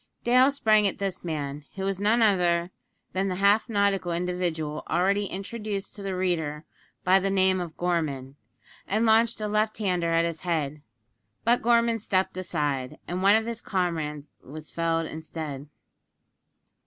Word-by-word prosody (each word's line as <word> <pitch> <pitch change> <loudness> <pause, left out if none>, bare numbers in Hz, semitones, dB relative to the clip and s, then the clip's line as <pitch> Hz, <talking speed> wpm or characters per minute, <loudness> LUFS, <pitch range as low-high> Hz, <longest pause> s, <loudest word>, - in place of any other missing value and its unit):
Dale 255 +3 +5
sprang 215 -7 +3
at 195 - -3
this 195 -2 -3
man, 150 -3 -4
who 190 - -4
was 195 -1 -1
none 220 +3 +3
other 175 -4 +2 0.4
than 190 +1 0
the 185 - -1
half 200 +5 +3
nautical 200 -4 +1
individual 170 -3 -2
already 195 +4 +2
introduced 200 +1 -5
to 205 - -9
the 195 -1 -3
reader 160 -5 -1 0.4
by 185 +1 +5
the 195 +1 -1
name 190 -1 +3
of 170 -3 -7
Gorman, 150 -7 -2 0.5
and 215 +4 +1
launched 225 +1 +4
a 210 - -1
left 215 +1 0
hander 180 -5 0
at 165 0 +3
his 165 -2 -4
head; 155 -4 -2 0.6
but 240 +2 +3
Gorman 235 -1 +3
stepped 190 -3 0
aside, 150 -8 -2
and 180 +1 -3
one 200 +2 +6
of 220 0 +2
his 230 0 -4
comrades 160 -6 -2
was 155 +3 -10
felled 165 -1 0
instead. 155 -3 -6
185 Hz, 155 wpm, -26 LUFS, 165-205 Hz, 0.6 s, one